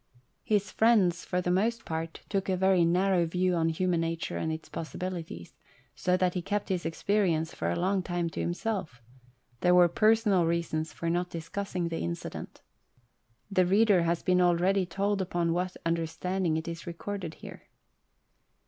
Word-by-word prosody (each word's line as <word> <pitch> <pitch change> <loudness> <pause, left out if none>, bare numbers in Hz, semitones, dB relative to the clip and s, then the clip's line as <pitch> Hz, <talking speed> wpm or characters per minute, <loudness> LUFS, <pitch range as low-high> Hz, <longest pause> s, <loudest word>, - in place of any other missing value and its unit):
His 205 -3 0
friends, 205 -7 +3
for 180 0 -1
the 180 - 0
most 225 +6 0
part, 160 0 -4
took 195 -2 -1
a 185 - +1
very 190 -1 +4
narrow 180 +1 +2
view 180 +2 +1
of 165 -1 +1
human 170 +1 0
nature 165 0 -3
and 160 - -1
its 160 0 -6
possibilities, 165 - -6 0.4
so 180 0 +1
that 180 -1 +1
he 180 - -2
kept 205 +3 -2
his 185 -2 -1
experience, 165 -3 0
for 85 - -2
a 85 - 0
long 190 +1 +1
time, 175 -1 -2
to - - -6
himself; 175 - -3 0.6
there 180 +5 +4
were 175 -1 +7
personal 215 -2 +3
reasons 165 -2 -1
for 170 - -5
not 175 +1 0
discussing 175 +1 -4
the 165 - -3
incident. 85 0 -6 0.9
The 185 -2 +3
reader 200 -1 +4
has 170 0 0
been 180 0 +3
already 180 +2 +3
told 200 +2 0
upon 175 -2 0
what 180 +1 -2
under 165 0 0
standing 175 0 -1
it 160 +1 -4
is 170 0 -6
recorded 175 0 -5
here. - - -12
180 Hz, 165 wpm, -29 LUFS, 165-190 Hz, 0.9 s, were